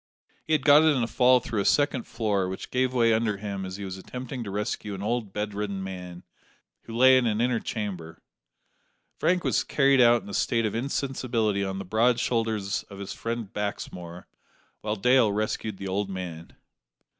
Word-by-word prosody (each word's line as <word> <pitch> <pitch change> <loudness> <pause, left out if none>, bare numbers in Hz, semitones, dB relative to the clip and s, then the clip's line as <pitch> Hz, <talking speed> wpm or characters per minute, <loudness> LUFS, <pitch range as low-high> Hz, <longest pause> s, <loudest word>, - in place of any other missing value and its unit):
He 160 - -1
had 150 -3 +1
got 145 0 +8
it 155 -2 +4
in 125 - +1
a - - -1
fall 125 +1 +4
through 110 -3 -2
a - - -3
second 145 -4 +2
floor, 105 -5 -1
which 95 - -7
gave 130 0 +1
way 115 -3 +3
under 110 -2 0
him 100 -1 -5
as 95 - -6
he 100 0 -6
was 95 0 -6
attempting 125 +4 -6
to 105 - -6
rescue 105 0 -3
an 95 - -6
old 110 -2 -2
bedridden 105 -1 -3
man, 90 -2 -7 0.6
who 115 - -8
lay 130 +1 +7
in 120 - 0
an 110 -1 0
inner 120 0 +1
chamber. 90 -9 -5 1.0
Frank 180 +1 +2
was - - +1
carried 135 -2 +3
out 120 -1 +5
in - - -11
a - - -7
state 115 -1 +1
of 105 - -1
insensibility 120 -5 -1
on 95 0 -3
the 95 - -5
broad 115 +5 +2
shoulders 110 -4 -1
of 100 - -10
his 100 0 -6
friend 115 -3 -5
Baxmore, 90 -4 -5 0.6
while 105 0 -2
Dale 125 +1 +4
rescued 105 0 -2
the 100 - -6
old 100 +1 -1
man. 90 -4 -7
110 Hz, 190 wpm, -26 LUFS, 100-125 Hz, 1.0 s, got